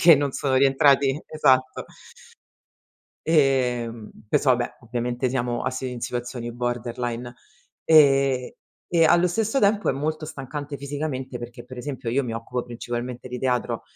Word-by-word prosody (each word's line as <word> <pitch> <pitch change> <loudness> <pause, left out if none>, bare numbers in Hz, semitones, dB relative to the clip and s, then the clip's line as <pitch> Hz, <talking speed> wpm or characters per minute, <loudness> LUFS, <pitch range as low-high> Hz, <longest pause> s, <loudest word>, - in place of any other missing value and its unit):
perché 165 -1 +9
non 140 -1 0
sono 135 -2 -1
rientrati 140 +1 +4
esatto. 130 -4 +2 1.4
Ehm, 125 -7 +1 0.2
questo 145 0 +3
vabbè, 120 -1 0
ovviamente 120 +1 -2
siamo 120 -2 -1
asi 130 0 -3
in 125 -1 -7
situazioni 120 0 -4
borderline. 120 0 -3 0.5
Ehm, 135 -4 +5 0.4
e 170 -2 +3
allo 175 +2 +5
stesso 225 +8 0
tempo 205 -2 +2
è - - +3
molto 155 +3 -3
stancante 145 +1 -6
fisicamente 140 -3 -4
perché 120 0 -9
per 125 0 -10
esempio 130 -3 -4
io 140 +3 +1
mi 115 -3 -4
occupo 120 +2 -4
principalmente 120 +1 -5
di 125 0 -5
teatro. 125 -2 -1
130 Hz, 140 wpm, -24 LUFS, 120-145 Hz, 1.4 s, perché